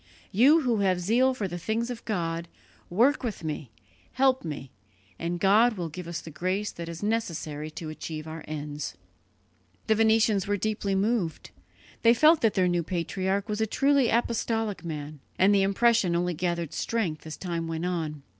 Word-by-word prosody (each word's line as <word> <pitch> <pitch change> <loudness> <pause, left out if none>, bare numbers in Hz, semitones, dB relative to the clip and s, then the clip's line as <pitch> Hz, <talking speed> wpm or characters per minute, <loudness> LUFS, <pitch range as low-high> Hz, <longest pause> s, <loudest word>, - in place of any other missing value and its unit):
You 275 - +6
who 245 -5 +1
have 190 -3 +2
zeal 245 +8 +2
for 205 -5 -2
the 175 -1 -5
things 230 +6 -1
of 235 -1 -7
God, 170 -5 -2 0.4
work 245 +12 +3
with 225 -8 -4
me, 155 -4 -4 0.4
help 260 0 +3
me, 145 -5 -6 0.5
and 170 +1 -2
God 215 +6 +5
will 170 -2 -3
give 180 +2 -8
us 170 0 -4
the 160 - -10
grace 185 +6 -2
that 170 -1 -7
is 170 +3 -7
necessary 165 -9 -2
to 155 0 -7
achieve 155 0 -6
our 160 +1 -7
ends." 150 - -5 0.9
The 220 - +3
Venetians 220 -2 +3
were 205 0 +1
deeply 205 -1 -1
moved; 200 -4 -1 0.5
they 230 +1 +6
felt 310 +5 +5
that 225 -2 +2
their 185 -1 +3
new 175 -1 +1
patriarch 190 +4 -2
was 210 0 -2
a 220 - +2
truly 275 +2 +3
apostolic 225 -3 0
man, 150 -2 -6 0.2
and 195 +3 +5
the 200 - +4
impression 195 -2 +3
only 175 +1 0
gathered 170 -1 -2
strength 180 -10 -2
as 155 - -6
time 170 -3 -3
went 165 +1 -3
on. 160 -5 -3
190 Hz, 175 wpm, -27 LUFS, 165-225 Hz, 0.9 s, You